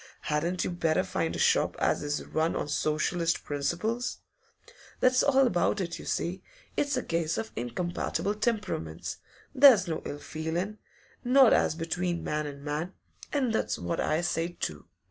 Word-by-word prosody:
Hadn't 170 +4 -1
you - - -2
better 165 -2 +1
find - - -2
a - - -3
shop - - +3
as - - +1
is 145 0 -2
run 160 +2 0
on - - -2
Socialist 155 +3 0
principles?" 180 - -2 0.8
That's 255 0 +4
all 270 -1 +4
about 210 -2 +1
it, 170 -3 -3
you - - -9
see; 180 +3 -2 0.3
it's 285 -2 0
a 255 - -1
case 165 -1 -1
of 225 - -4
incompatible 175 - -2
temperaments; 210 - -2 0.4
there's 255 -9 +7
no 160 -2 -2
ill 145 - -5
feelin', 170 +8 -4 0.4
not 255 -1 +6
as - - +3
between 170 +1 -2
man 150 0 -1
and 140 -1 -8
man, 155 +5 -3 0.4
And 260 -6 +1
that's - - 0
what 85 0 -3
I 155 +2 +1
say, 175 0 -2
too. 75 -2 -4
170 Hz, 160 wpm, -29 LUFS, 155-215 Hz, 0.8 s, there's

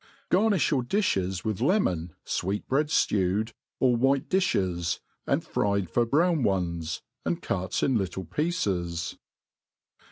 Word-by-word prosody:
Gai; 180 - +5
ni(b 210 - +3
jrour 140 -5 +2
difhes'with 105 - 0
lemon^ 115 - +1 0.2
fweet*breads 130 - +1
fiewed, 105 +3 0 0.3
or 125 -2 +4
white 135 +3 +2
difhes^ 90 - +1 0.3
and - - +1
fried 100 -4 0
for 120 +5 +2
brown 165 +4 +3
pnes^ 85 -6 -1 0.2
and - - -1
cut - - -2
in 130 -5 +3
little 95 -1 -3
pieces. 90 - -2
105 Hz, 120 wpm, -27 LUFS, 90-140 Hz, 0.3 s, Gai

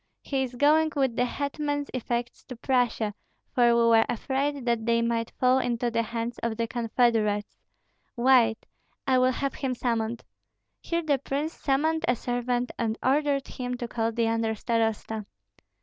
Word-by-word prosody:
He 270 -2 -1
is 255 -1 -3
going 310 +4 +4
with 265 -4 +1
the 245 - +2
hetman's 290 +2 -3
effects 240 -1 -3
to 255 - -8
Prussia, 240 -4 0 0.4
for 245 -1 +4
we 235 0 +4
were 225 -1 +5
afraid 270 +3 -1
that 235 -2 0
they 230 0 +3
might 230 -1 0
fall 255 +1 +4
into 240 -1 -1
the 230 0 +1
hands 230 +1 -4
of 230 -2 -2
the 230 -1 -1
confederates. 225 -3 +1 0.6
Wait, 235 -3 +4 0.4
I 260 -1 +3
will 255 0 +4
have 275 +1 -2
him 260 -2 -2
summoned." 230 -1 -2 0.6
Here 335 0 -2
the 290 -3 +1
prince 285 +4 -3
summoned 315 +4 0
a 245 - +3
servant 245 +1 -2
and 225 -1 -1
ordered 280 0 +1
him 250 -1 -4
to 240 - -4
call 225 -1 -1
the 230 0 0
under 225 -1 0
starosta. 220 -2 -1
245 Hz, 165 wpm, -27 LUFS, 230-270 Hz, 0.6 s, were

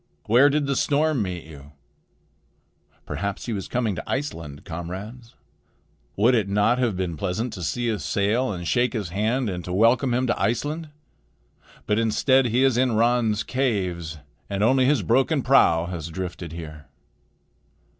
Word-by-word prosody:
Where 125 +6 +5
did 145 0 0
the 140 0 -1
storm 150 -1 +1
meet 90 -4 -4
you? 75 -2 -13 1.3
Perhaps 100 0 -4
he 120 - -3
was 100 -3 -4
coming 120 -4 -1
to - - -7
Iceland, 80 - -4
comrades. 95 +8 -7 0.8
Would 115 +6 +4
it 110 -5 +1
not 105 +5 +2
have 115 -7 0
been 90 -3 -2
pleasant 105 +7 -3
to 95 - -7
see 120 +8 -2
his 110 -3 -2
sail 110 +5 0
and 90 -3 -5
to - - -5
shake 125 0 +1
his 105 -7 -3
hand 110 +7 0
and 90 -3 -4
to 90 - -6
welcome 115 +6 +3
him 125 +2 +1
to 120 - -1
Iceland? 145 +10 -1 1.0
But 105 +1 +1
instead 125 +4 +3
he 120 +3 +2
is 135 -3 +3
in 125 -2 +2
Ran's 115 -2 +2
caves, 90 -11 -2 0.3
and 100 0 -1
only 130 +3 +4
his 135 -5 +2
broken 135 - +2
prow 105 -11 +4
has 85 -3 -5
drifted 85 0 -6
here." 75 -2 -9
110 Hz, 165 wpm, -24 LUFS, 90-125 Hz, 1.3 s, Where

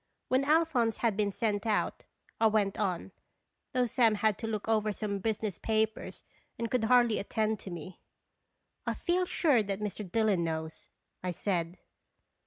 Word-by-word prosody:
When 260 +2 +3
Alphonse 295 -7 +3
had 230 -4 +1
been 205 0 +1
sent 210 0 -1
out, 215 - 0 0.3
I 225 - +5
went 210 -2 +1
on, 190 -2 -1 0.6
though 250 -1 +2
Sam 235 -3 +3
had 215 0 +2
to 225 - -3
look 215 -1 -3
over 215 -1 +2
some 200 -1 -3
business 215 -2 -2
papers, 220 0 -1 0.3
and 230 -1 -3
could 250 -3 +2
hardly 240 -1 +4
attend 215 +1 -1
to - - -8
me. 175 +1 -8 0.4
" - - -40
I - - 0
feel 360 +1 +1
sure 290 -11 +3
that 200 -1 -3
Mr. 210 -2 -5
Dillon 215 -5 +2
knows," 160 -1 -4 0.3
I 185 - -2
said. 175 -1 -2
215 Hz, 165 wpm, -31 LUFS, 195-230 Hz, 0.6 s, I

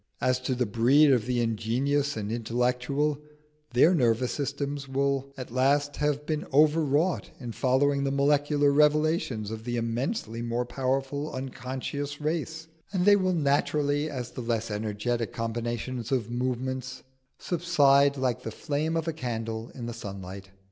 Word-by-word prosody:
As 130 0 +1
to 130 0 -2
the 125 0 +1
breed 130 +7 +4
of 120 -3 +2
the 125 -1 +1
ingenious 125 +5 0
and 105 0 -3
intellectual, 125 +5 0 0.5
their 130 +8 +5
nervous 120 -5 +2
systems 140 0 -3
will 140 0 0
at 130 -2 -7
last 140 +3 +2
have 150 0 0
been 155 -1 -2
overwrought 155 +3 +3
in 120 -3 -6
following 140 +3 +2
the 140 - +1
molecular 145 +1 +3
revelations 150 -7 +2
of 110 0 -6
the 120 0 -2
immensely 115 - -2
more 120 +1 -1
powerful 135 +3 -2
unconscious 135 +2 -5
race, 160 +1 -3 0.2
and 185 -2 0
they 205 0 +8
will 185 -2 +1
naturally, 145 0 +1
as 125 -4 -5
the - - -6
less 115 -2 -2
energetic 110 +2 -2
combinations 120 +1 -3
of 120 -4 0
movement, 130 +1 -3 0.3
subside 140 -5 +3
like 130 -3 0
the - - -5
flame 150 +7 -2
of 165 0 -2
a 165 - 0
candle 115 -5 -4
in 120 - -6
the 120 - -4
sunlight. 95 -3 -8
130 Hz, 150 wpm, -27 LUFS, 120-145 Hz, 0.5 s, they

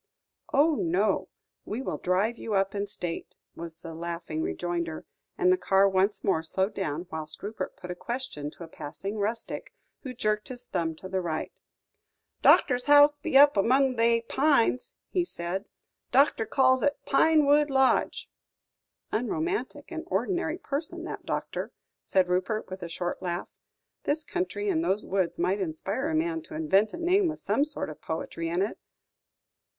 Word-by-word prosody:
"Oh, 305 +4 +4
no, 190 +2 +1 0.3
we 230 +6 -4
will - - -3
drive 195 +6 +1
you 215 - -2
up 195 0 +1
in 200 0 -2
state," 175 -4 -5 0.2
was 165 -1 -9
the 165 -1 -7
laughing 170 -1 -4
rejoinder; 170 -2 -3 0.3
and 365 -1 +4
the 370 - 0
car 195 0 +4
once 195 +2 +1
more 175 -5 +2
slowed 190 +5 -1
down, 170 -3 -3
whilst 155 -1 -6
Rupert 210 -1 -5
put 180 -1 -7
a - - -4
question 235 - -4
to 170 - -11
a - - -8
passing 180 +7 -6
rustic, 220 +3 -3 0.3
who 255 -3 -7
jerked 215 -2 0
his 250 -2 -8
thumb 170 -8 -2
to 190 - -9
the 190 0 -1
right. 160 -3 -3 0.9
"Doctor's 250 -3 +5
house 290 0 +7
be 305 -3 +2
up 285 +1 +8
among 255 +6 +3
they 230 0 +3
pines," 255 0 +2 0.2
he 360 - +2
said; 190 - -3 0.5
"Doctor 265 -4 +4
calls 260 -1 +4
'un 285 - +4 0.2
Pinewood 295 0 +4
Lodge." 265 -1 +2 0.8
"Unromantic 325 - -2
and - - -4
ordinary 345 -3 -1
person, 300 -3 -4
that - - -7
doctor," - - -3 0.3
said 185 -2 +2
Rupert, 185 +3 -1
with 190 0 -6
a 170 - -5
short 175 +2 -3
laugh; 175 -1 -3 0.6
"this 300 +2 0
country 375 +4 -3
and 330 -5 +1
those 205 - +1
woods 190 -3 0
might 185 +4 +1
inspire 195 - -2
a 320 - -1
man 330 +1 0
to 320 0 -10
invent 220 -10 +3
a - - -7
name 360 +3 +3
with 315 -1 -3
some 280 - +1
sort 300 - -4
of 150 - -12
poetry 165 +1 -4
in 175 +3 +1
it. 205 - -4
215 Hz, 165 wpm, -28 LUFS, 180-290 Hz, 0.9 s, up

